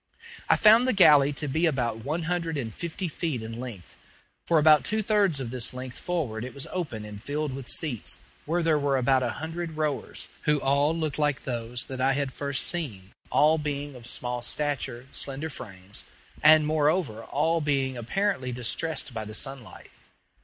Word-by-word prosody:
I - - +7
found 225 +4 +6
the 255 - +3
galley 150 -6 +7
to 150 +1 -3
be 160 +5 +2
about 120 -7 0
one 155 +6 -2
hundred 165 -2 -1
and 115 -5 -4
fifty 170 - -4
feet 155 -6 -3
in 115 +1 -7
length. 115 -8 -9 0.5
For 170 - +4
about 155 -1 +6
two 215 0 0
thirds 200 -8 +2
of 125 -3 -4
this 125 0 -3
length 130 0 -7
forward 140 -11 -2
it 130 - -7
was 140 - -3
open 140 -13 -4
and 105 -1 -9
filled 145 +2 -3
with 135 -2 -7
seats, 135 -9 0 0.3
where 170 +2 +1
there 160 -2 +3
were 140 -1 +1
about 130 +1 +3
a 125 - 0
hundred 165 0 -5
rowers, 150 -3 -2 0.2
who 150 -1 +3
all 140 +4 +2
looked 155 -3 -2
like 150 -2 +1
those 120 -1 -3
that 130 -1 -6
I 135 +1 +3
had 140 -1 -2
first 140 -2 +2
seen, 110 - +1 0.2
all 155 +2 +4
being 145 -1 -3
of 120 -2 -8
small 125 0 -3
stature, 130 -2 -3
slender 140 +3 -4
frames, 95 -4 -9 0.4
and, 155 0 +7
moreover, 150 -5 +1
all 160 +6 +1
being 135 -3 0
apparently 130 - -1
distressed 125 +4 -2
by 110 -1 -4
the 105 0 -6
sunlight. 135 0 -6
140 Hz, 180 wpm, -27 LUFS, 125-160 Hz, 0.5 s, I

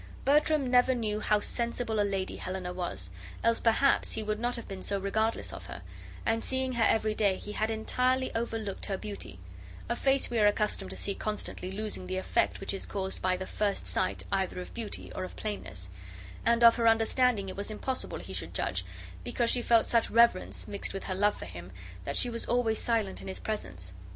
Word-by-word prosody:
Bertram 300 0 +4
never 250 +1 +4
knew 215 -3 -1
how 210 -1 +2
sensible 235 0 -1
a - - +5
lady 195 -2 -1
Helena 185 -1 -4
was, 100 - -3 0.3
else 230 0 +3
perhaps 240 +4 +4
he 220 - -1
would 210 0 -2
not 245 +1 0
have 235 - -6
been 195 -1 -6
so 200 - -1
regardless 220 +3 0
of - - -8
her; - - -8 0.4
and 225 0 +1
seeing 260 0 0
her 235 -2 +2
every 220 -1 +3
day, 200 -3 +2
he 210 - -7
had 215 +1 0
entirely 255 +4 +1
over 230 0 -1
looked 205 -3 -4
her 195 - -1
beauty; 200 - -7 0.5
a 235 - 0
face 270 +2 +3
we 235 - +1
are 210 - +6
accustomed 205 - +1
to 95 - -5
see 200 - -1
constantly 210 -3 -4
losing 205 -2 -2
the 185 0 -2
effect 190 - +1
which 195 - -3
is 195 - -4
caused 190 -1 -3
by 185 0 +1
the 190 - -4
first 205 0 -1
sight 185 - 0
either 190 -2 0
of 180 - -8
beauty 230 -3 -5
or 185 - -3
of 185 - -7
plainness; 95 - -5 0.6
and 235 0 +4
of 235 0 +8
her 230 -1 +3
understanding 225 -1 +3
it 185 - -5
was 200 +1 -3
impossible 255 +5 -3
he - - -8
should - - -3
judge, - - -1 0.4
because 235 -1 +1
she 245 - +3
felt 230 -1 +4
such 230 -1 +2
reverence, 235 -5 +3
mixed 200 -1 -2
with 195 - -4
her 185 - -2
love 205 +2 +2
for - - -7
him, 90 +1 -9 0.3
that 140 - -1
she - - +4
was 235 -1 -3
always 230 -2 +2
silent 225 -5 0
in - - -9
his 190 - -3
presence. 90 - -5
215 Hz, 210 wpm, -30 LUFS, 190-235 Hz, 0.6 s, of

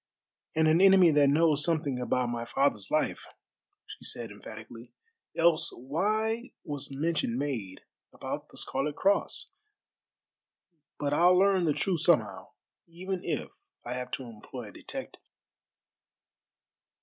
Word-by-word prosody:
"And 160 0 +3
an 160 +3 +4
enemy 190 -3 +7
that 145 -2 +5
knows 150 0 +3
something 150 -6 0
about 125 0 0
my 120 0 -3
father's 120 -5 0
life," - - 0 0.6
she - - -11
said 115 -3 -5
emphatically, 110 +3 -11 0.4
"else 165 -1 +3
why 215 - -1
was 145 -3 -4
mention 140 -4 -1
made 120 -10 -4 0.3
about - - -6
the - - -15
Scarlet 145 +2 -2
Cross? 200 +1 0 1.5
But 145 0 -1
I'll 175 +4 +5
learn 190 -2 +4
the 155 - +2
truth 165 +4 0
somehow, 155 - +2 0.4
even 180 +2 -5
if - - -3 0.3
I 120 - -3
have 125 0 -5
to 130 - -3
employ 115 0 -9
a - - -15
detective." - - -8
145 Hz, 125 wpm, -29 LUFS, 125-170 Hz, 1.5 s, enemy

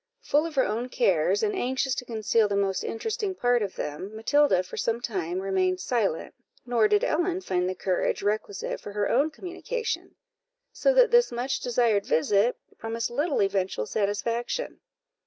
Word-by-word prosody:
Full 300 +3 +2
of 320 - -9
her 265 - +3
own 230 +4 -2
cares, 450 - +2
and 420 -1 +1
anxious 260 -4 0
to 250 - -4
conceal 220 -1 +1
the 200 - -1
most 195 -1 0
interesting 410 - -3
part 245 -6 +2
of 200 -2 -3
them, 185 +8 -5
Matilda 225 -3 +3
for 180 - -9
some 230 0 -1
time 185 -7 -3
remained 185 -1 0
silent, 200 -5 -1 0.3
nor 235 -3 +3
did 210 0 +2
Ellen 350 +3 0
find 180 - 0
the 185 - -3
courage 185 +1 -1
requisite 415 - -2
for 205 - -8
her 205 -1 0
own 280 +5 +3
communication; 455 +8 -5 0.6
so - - +3
that - - +6
this 480 0 +5
much 250 +3 -2
desired 235 -4 +1
visit 200 +8 +2 0.2
promised 225 +1 -3
little 290 -1 +1
eventual 190 - -1
satisfaction. 230 - -2
230 Hz, 165 wpm, -26 LUFS, 200-295 Hz, 0.6 s, that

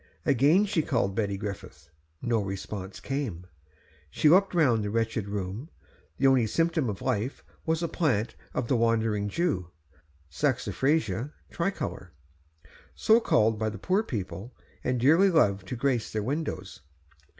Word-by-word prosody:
Again 150 - +4
she 195 -5 +1
called 115 -9 0
Betty 100 -1 -1
Griffith; 95 -6 -7 0.3
no 120 -3 +1
response 95 0 -6
came. 130 - -4 0.6
She 150 - +3
looked 190 +3 +4
round 125 -10 +3
the 105 - -2
wretched 115 -1 -1
room; 100 - -4 0.5
the 135 - +1
only 130 -4 +5
symptom 165 -1 +1
of 105 +4 -5
life 125 0 -2 0.2
was 160 +1 +1
a - - +1
plant 125 - 0 0.2
of 120 - -1
the 130 - +2
Wandering 115 -3 +1
Jew 100 - -1 0.6
(Saxifraga 130 - 0 0.2
tricolor), 100 - -3 0.9
so 220 +1 +5
called 110 - +2
by 110 0 0
the 110 - -7
poor 190 - +1
people, 115 - -6 0.3
and 125 -1 0
dearly 160 +10 +5
loved 100 - +2
to 125 - -4
grace 125 -2 0
their 110 -1 -2
windows. 125 - -4
115 Hz, 140 wpm, -28 LUFS, 100-150 Hz, 0.9 s, only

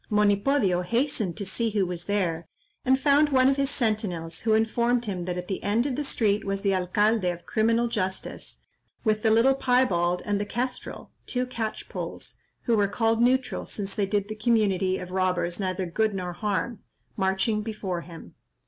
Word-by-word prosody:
Monipodio 205 -1 +2
hastened 230 - 0
to 200 - -3
see 225 +4 -1
who 205 -3 +1
was 175 -1 -5
there, 170 -5 -1 0.4
and 260 +1 +3
found 290 +2 +4
one 260 -2 +4
of 270 - +4
his 275 -1 +1
sentinels, 210 - -1
who 220 -1 +3
informed 235 +2 +1
him 185 -4 -3
that 180 0 -3
at 180 0 -5
the 190 - -3
end 220 +4 +1
of 275 -3 -1
the 295 - -2
street 215 -6 +1
was 195 0 -2
the 195 -1 +2
alcalde 205 +4 +2
of 175 -1 -5
criminal 230 +2 +2
justice, 190 -5 -4 0.4
with 215 -1 +1
the 220 - +3
little 230 +5 +5
Piebald 200 -10 +2
and 205 -1 0
the - - -2
Kestrel 250 +4 -4 0.2
(two 250 0 -1
catchpolls, 230 -3 -5 0.3
who 235 - +2
were 205 -2 +3
called 225 +2 +1
neutral, 255 +2 +1
since 200 -2 -5
they 200 -2 0
did 205 0 0
the 215 - -4
community 200 -5 +2
of 180 0 -7
robbers 180 -1 0
neither 185 -1 -1
good 215 +4 0
nor 180 -2 -3
harm), 210 +3 -2 0.4
marching 190 +2 +1
before 210 -5 -4
him. 165 -1 -12
210 Hz, 180 wpm, -26 LUFS, 185-235 Hz, 0.4 s, little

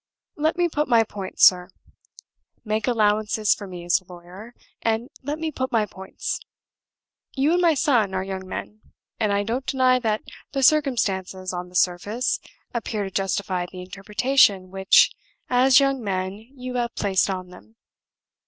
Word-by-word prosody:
Let 310 +3 0
me 350 0 +3
put 300 -2 -1
my 230 -2 +5
points, 200 -3 +1
sir 180 -1 +5 1.0
make 215 +2 -1
allowances 215 -2 +2
for 205 - -8
me 175 -2 -8
as 175 +2 +2
a 185 0 -17
lawyer 180 +7 -12 0.3
and 225 +2 -1
let 290 +3 -3
me 320 0 -3
put 260 -2 -3
my 225 -3 +2
points. 190 -1 -5 1.0
You 280 +5 +2
and 355 - +2
my 335 -3 +4
son 235 -10 +2
are 185 - -1
young 190 -1 -6
men; 215 +3 -7 0.4
and 215 -2 +1
I 200 0 +1
don't 235 +5 -2
deny 255 -1 +2
that 220 -3 -1 0.3
the 275 -1 -1
circumstances, 195 -11 +1
on 180 0 -5
the 180 - -16
surface, 205 +8 0 0.3
appear 225 -3 -2
to 195 - -5
justify 190 -2 -1
the 185 - -8
interpretation 200 0 +2
which, 190 0 +5 0.4
as 255 +2 +6
young 275 -3 +1
men, 190 -2 -2 0.2
you 255 -1 -6
have 235 -1 -2
placed 195 -1 +1
on 185 -1 -4
them. 220 +5 -16
215 Hz, 160 wpm, -23 LUFS, 190-255 Hz, 1.0 s, as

